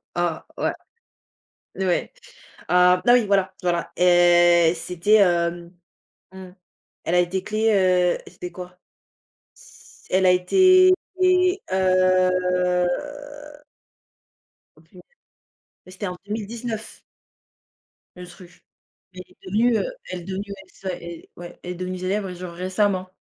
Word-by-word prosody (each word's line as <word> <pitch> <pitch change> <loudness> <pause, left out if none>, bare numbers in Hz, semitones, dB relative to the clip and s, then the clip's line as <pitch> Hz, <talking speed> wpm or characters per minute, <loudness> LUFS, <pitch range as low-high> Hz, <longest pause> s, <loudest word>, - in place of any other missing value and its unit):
ah - - -2
ouais - - 0 1.1
et 190 - 0
ouais. 180 - -1 0.5
Ah, 180 0 +4
bah 240 - +6
oui, 245 -2 +4
voilà, 195 -1 +1
voilà. 175 -1 -2
Et 175 -1 +5
c'était 180 +5 0
hem, 175 -3 +1 0.6
mmh, 190 -1 -11 0.5
elle 170 - -1
a - - +4
été 185 +2 -2
créée, 215 +2 0
heu, 180 -3 +2
c'était 180 - -8
quoi? 180 0 -10 0.8
S - - -19
elle 190 0 +2
a - - +6
été 370 - +5 0.3
et 365 +1 +3
heu 185 -1 +2 1.9
Oh - - -21
punai - - -18 0.9
ouais 185 - -13
c'était 200 +2 -6
en 180 - -5
2019. 220 +1 -6 1.2
Le 180 0 -10
truc, 175 0 -16 0.5
elle 180 - -8
est 180 - -19
devenue, 225 +4 +2
heu, - - -2 0.3
elle 185 - -5
est - - -12
devenue 190 +2 -5
ouais 200 -1 -9
c'est 190 - -9
ça, 180 - -3 0.4
ouais, 175 0 -11
elle 180 - -6
est - - -6
devenue 185 +1 -5
célèbre 190 +2 -2
et 180 - -8
genre 180 -1 -8
récemment. 185 +1 -1
185 Hz, 135 wpm, -22 LUFS, 180-205 Hz, 1.9 s, bah